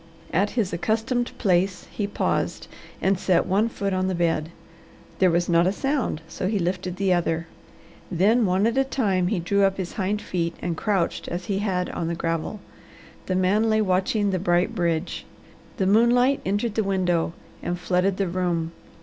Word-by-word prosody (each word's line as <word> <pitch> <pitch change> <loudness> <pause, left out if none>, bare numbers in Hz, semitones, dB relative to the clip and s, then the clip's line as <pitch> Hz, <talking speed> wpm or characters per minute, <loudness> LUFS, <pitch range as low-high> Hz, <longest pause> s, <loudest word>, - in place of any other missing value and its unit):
At 200 +4 +2
his 205 -5 +1
accustomed 225 +7 0
place 185 -2 +1
he 205 - -2
paused 205 - -1 0.4
and 190 -1 +2
set 185 -2 +2
one 205 +5 +2
foot 200 -3 -2
on 185 0 0
the 190 - -1
bed. 165 -2 0 0.7
There 185 - +5
was 175 +1 +1
not 170 0 +4
a - - +3
sound, 270 - -1
so 185 - -3
he 210 +1 0
lifted 180 0 -2
the 190 -1 +2
other. 165 -1 0 0.7
Then 205 +6 +3
one 185 +3 +2
at 235 +3 +2
a - - +4
time 200 -9 0
he 200 - 0
drew 200 +4 +1
up 195 0 +2
his 185 -2 -4
hind 205 +1 -1
feet 170 -4 -2
and 175 -1 -2
crouched 190 -1 -1
as 175 +1 -4
he 195 0 -1
had 185 -3 0
on 165 - -3
the 170 - -1
gravel. 165 +5 -3 0.7
The 185 - 0
man 200 +5 +2
lay 220 0 +3
watching 200 +1 +1
the 185 - 0
bright 175 0 +1
bridge. 170 -3 -1 0.5
The 190 - +1
moonlight 240 +6 +4
entered 205 +3 0
the 220 - +1
window 180 -4 0 0.3
and 175 - -2
flooded 180 +2 +1
the 195 - 0
room. 170 -2 -1
185 Hz, 185 wpm, -24 LUFS, 175-205 Hz, 0.7 s, There